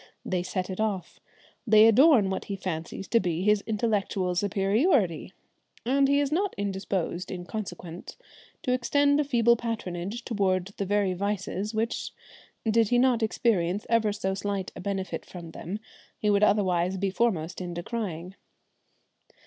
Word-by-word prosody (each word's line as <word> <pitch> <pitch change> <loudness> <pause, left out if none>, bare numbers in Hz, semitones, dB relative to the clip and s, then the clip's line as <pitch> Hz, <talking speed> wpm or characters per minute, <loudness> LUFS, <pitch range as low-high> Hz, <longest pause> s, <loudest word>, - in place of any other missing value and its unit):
They 185 -2 0
set 185 +1 -3
it 185 - -6
off. 205 -4 -2 0.5
They 215 0 +7
adorn 225 -3 +6
what 190 - -3
he 200 - -4
fancies 185 0 -5
to 230 - +4
be 175 -2 -1
his 210 0 +3
intellectual 205 -4 0
superiority, 195 - +1 0.5
and 275 +3 +3
he 280 +1 +3
is 285 -1 0
not 385 +5 0
indisposed 190 -3 -2
in 180 -1 -6
consequence 180 -4 -7 0.5
to 250 -5 +1
extend 285 +3 +2
a - - +3
feeble 235 -4 +3
patronage 220 -2 -4
towards 195 -4 0
the 200 - -3
very 205 -1 +1
vices 200 +2 -3
which, 225 +2 -2 0.5
did 225 -1 +3
he 245 - +3
not 245 -2 +3
experience 205 -4 +1
ever 225 -2 +3
so 190 -2 -2
slight 195 -1 -3
a - - -7
benefit 195 0 -3
from 170 -3 -10
them, 175 +5 -5 0.4
he 210 - +1
would 200 0 +3
otherwise 190 -3 +2
be 195 0 -1
foremost 185 -6 0
in 175 -1 -5
decrying. 180 -2 -4
200 Hz, 150 wpm, -27 LUFS, 185-230 Hz, 0.5 s, They